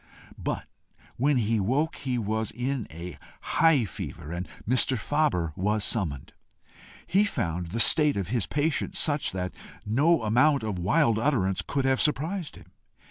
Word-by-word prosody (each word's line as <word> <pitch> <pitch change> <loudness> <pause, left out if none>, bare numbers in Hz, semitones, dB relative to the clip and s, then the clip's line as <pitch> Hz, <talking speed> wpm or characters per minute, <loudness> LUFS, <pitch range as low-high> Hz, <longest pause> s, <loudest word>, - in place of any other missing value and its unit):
But - - -3 0.5
when 140 +2 +2
he 115 -1 +1
woke, 135 - 0
he 130 -2 -2
was 110 -1 -2
in 125 +1 -3
a 85 -2 -9 0.2
high 155 -7 +3
fever, 80 -3 -7
and 85 +1 -4 0.2
Mr. 130 +2 +2
Faber 110 - 0
was 105 +3 0
summoned. 85 - -2 0.7
He 195 +3 +3
found 90 - -2
the 110 +8 -4
state 150 +3 +4
of 100 -2 -3
his 115 -3 0
patient 150 +2 -1
such 145 -2 +2
that 90 -1 -3 0.3
no 145 +8 +2
amount 130 +5 +3
of 105 -4 -3
wild 115 - +2
utterance 110 -9 +1
could 140 -2 -2
have 130 0 +2
surprised 160 +3 0
him. 90 - -16
115 Hz, 150 wpm, -27 LUFS, 95-145 Hz, 0.7 s, state